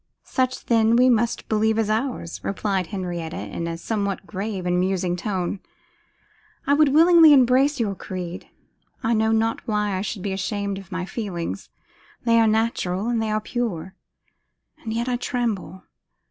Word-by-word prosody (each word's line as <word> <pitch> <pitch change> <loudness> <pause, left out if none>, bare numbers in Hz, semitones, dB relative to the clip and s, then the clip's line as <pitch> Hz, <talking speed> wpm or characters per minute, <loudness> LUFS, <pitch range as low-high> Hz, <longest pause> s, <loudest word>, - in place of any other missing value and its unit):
'Such, 255 -1 -1
then, 225 -1 +3
we 250 +1 +5
must 235 0 0
believe 220 0 +1
is 225 -2 +1
ours,' 220 -5 -2
replied 195 -2 -1
Henrietta, 175 -3 -4
in 170 - -5
a 165 0 -4
somewhat 200 +1 -2
grave 195 -1 -4
and 180 0 +1
musing 185 -1 0
tone: 185 0 -2 1.1
'I 280 - +3
would 300 0 +5
willingly 325 +1 +7
embrace 265 +2 +4
your 210 -4 0
creed. 180 -2 -6 0.6
I 230 - +2
know 220 0 +2
not 225 0 0
why 210 -2 0
I 185 - -2
should 200 -1 -4
be 200 -2 -2
ashamed 200 +1 -2
of 195 0 -14
my 185 0 -3
feelings. 175 - -5 0.6
They 230 -1 +4
are 225 - +4
natural, 215 -2 0
and 235 -2 0
they 220 - -1
are 215 0 +1
pure. 210 -6 -3 0.9
And 220 - -6
yet 235 +2 -2
I 250 -1 0
tremble. 230 -7 -3
215 Hz, 160 wpm, -23 LUFS, 185-235 Hz, 1.1 s, willingly